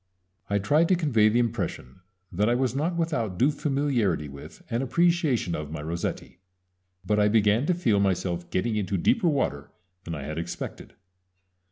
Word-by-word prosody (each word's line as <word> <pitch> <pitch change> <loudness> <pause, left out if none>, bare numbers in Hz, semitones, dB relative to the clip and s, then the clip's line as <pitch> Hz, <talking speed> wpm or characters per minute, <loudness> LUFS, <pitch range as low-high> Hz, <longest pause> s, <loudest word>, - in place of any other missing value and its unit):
I 100 - +2
tried 150 +12 +3
to 185 - +5
convey 125 -11 +3
the 110 - +1
impression 100 - -2 0.3
that 105 +5 +1
I 120 - +3
was 125 -2 0
not 160 +5 0
without 120 - -1
due 135 +8 +3
familiarity 135 - 0
with 70 +1 -12
and 115 +2 -1
appreciation 160 - +1
of 75 -2 -4
my 75 -1 -6
Rossetti; 85 +2 -4 0.7
but 105 0 +1
I 105 - +4
began 110 +4 +3
to 180 - +2
feel 115 - +2
myself 90 -3 -1
getting 110 +4 -1
into 100 -1 -1
deeper 180 - +2
water 130 - -1 0.4
than 85 - -4
I 75 - -6
had 75 +3 -4
expected. 85 +1 -7
110 Hz, 170 wpm, -26 LUFS, 90-140 Hz, 0.7 s, to